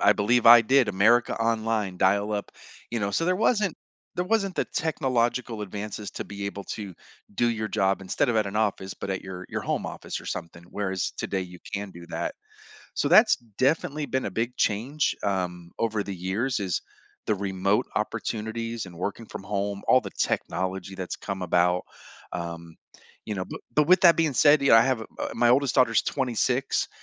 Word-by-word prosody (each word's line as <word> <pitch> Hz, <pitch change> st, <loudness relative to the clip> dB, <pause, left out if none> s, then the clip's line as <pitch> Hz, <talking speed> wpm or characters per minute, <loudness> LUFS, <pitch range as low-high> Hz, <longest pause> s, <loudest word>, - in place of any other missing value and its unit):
I 105 Hz, -, +6 dB
believe 115 Hz, +3 st, +2 dB
I 120 Hz, 0 st, +10 dB
did 130 Hz, +1 st, +3 dB
America 110 Hz, +5 st, +3 dB
Online 110 Hz, -4 st, 0 dB
dial 100 Hz, +2 st, +2 dB
up, 100 Hz, -1 st, -3 dB, 0.4 s
you 120 Hz, -, -1 dB
know, 100 Hz, -1 st, -1 dB
so 165 Hz, -, 0 dB
there 185 Hz, 0 st, +2 dB
wasn't 210 Hz, -4 st, +1 dB, 0.4 s
there 180 Hz, -, 0 dB
wasn't 195 Hz, -2 st, 0 dB
the -, -, 0 dB
technological 125 Hz, -6 st, -1 dB
advances 105 Hz, +1 st, -5 dB
to -, -, -5 dB
be 100 Hz, 0 st, -6 dB
able 100 Hz, 0 st, -5 dB
to 100 Hz, -4 st, -6 dB, 0.4 s
do 120 Hz, +3 st, +2 dB
your 110 Hz, -2 st, -1 dB
job 95 Hz, 0 st, +1 dB
instead 95 Hz, +5 st, 0 dB
of 115 Hz, -, 0 dB
at 110 Hz, -2 st, +2 dB
an 100 Hz, +2 st, -4 dB
office, 100 Hz, -3 st, -1 dB
but 100 Hz, -, -6 dB
at 95 Hz, -, -2 dB
your 90 Hz, -1 st, -8 dB
your -, -, -2 dB
home -, -, -2 dB
office -, -, -5 dB
or -, -, -14 dB
something, 85 Hz, +1 st, -6 dB
whereas 95 Hz, -3 st, -2 dB
today 95 Hz, -, -2 dB
you 90 Hz, 0 st, -10 dB, 0.2 s
can 100 Hz, 0 st, -4 dB
do 85 Hz, -1 st, -12 dB
that. 315 Hz, -3 st, -3 dB, 0.6 s
So -, -, +1 dB
that's 215 Hz, 0 st, +6 dB, 0.2 s
definitely 145 Hz, +2 st, +1 dB
been 130 Hz, -, -1 dB
a 100 Hz, -, -3 dB
big 115 Hz, +4 st, -2 dB
change, 125 Hz, +9 st, 0 dB
um, 90 Hz, -4 st, -2 dB
over 110 Hz, -2 st, 0 dB
the 100 Hz, -1 st, -5 dB
years 100 Hz, +9 st, -1 dB
is 95 Hz, -4 st, -1 dB, 0.5 s
the 105 Hz, -, +2 dB
remote 100 Hz, +1 st, 0 dB
opportunities 115 Hz, +1 st, -3 dB
and 90 Hz, -2 st, -12 dB
working 100 Hz, +5 st, -4 dB
from -, -, -8 dB
home, 100 Hz, 0 st, -2 dB
all 130 Hz, -, +6 dB
the -, -, -7 dB
technology 95 Hz, +1 st, -2 dB
that's 95 Hz, -1 st, -4 dB
come 100 Hz, -2 st, -5 dB
about, 90 Hz, +1 st, +2 dB, 0.5 s
um, 85 Hz, -1 st, -6 dB, 0.5 s
you 105 Hz, -, -3 dB
know, 95 Hz, -1 st, -3 dB
b -, -, -7 dB, 0.2 s
but 150 Hz, -1 st, +3 dB
with 185 Hz, 0 st, +6 dB
that 170 Hz, -3 st, +7 dB
being 160 Hz, -3 st, +2 dB
said, 145 Hz, +3 st, +5 dB
you 140 Hz, -, +3 dB
know, -, -, +9 dB
I 115 Hz, -, +8 dB
have 130 Hz, -1 st, +1 dB
uh, -, -, -6 dB
my 120 Hz, -, +3 dB
oldest 135 Hz, +1 st, +3 dB
daughter's 115 Hz, -4 st, +4 dB
26, 125 Hz, 0 st, 0 dB
105 Hz, 195 wpm, -26 LUFS, 95-125 Hz, 0.6 s, I